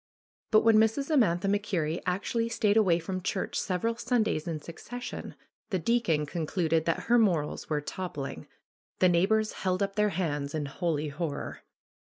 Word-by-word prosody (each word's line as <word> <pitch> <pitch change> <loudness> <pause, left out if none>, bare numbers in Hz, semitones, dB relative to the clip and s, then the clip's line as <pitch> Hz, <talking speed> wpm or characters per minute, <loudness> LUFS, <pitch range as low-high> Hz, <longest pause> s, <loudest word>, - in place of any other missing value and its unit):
But 215 - +6
when 225 -1 +5
Mrs. 225 +7 +2
Amantha 200 - +3
MacKerrie 185 -6 0
actually 230 +5 0
stayed 215 -2 +2
away 190 -6 +4
from 185 +2 -4
church 185 - -2
several 225 +5 -1
Sundays 230 -9 0
in 160 -2 -2
succession 245 +11 -7 0.3
the 195 - 0
deacon 175 -6 +1
concluded 160 +1 0
that 165 - 0
her 240 +1 +3
morals 170 -9 +1
were 150 -1 0
toppling. 150 -3 -5 0.5
The 185 - +5
neighbors 215 +5 +2
held 185 0 0
up 195 0 -3
their 210 0 +3
hands 150 -6 -2
in 150 -2 -1
holy 155 0 -2
horror. 145 0 -4
185 Hz, 155 wpm, -29 LUFS, 160-215 Hz, 0.5 s, But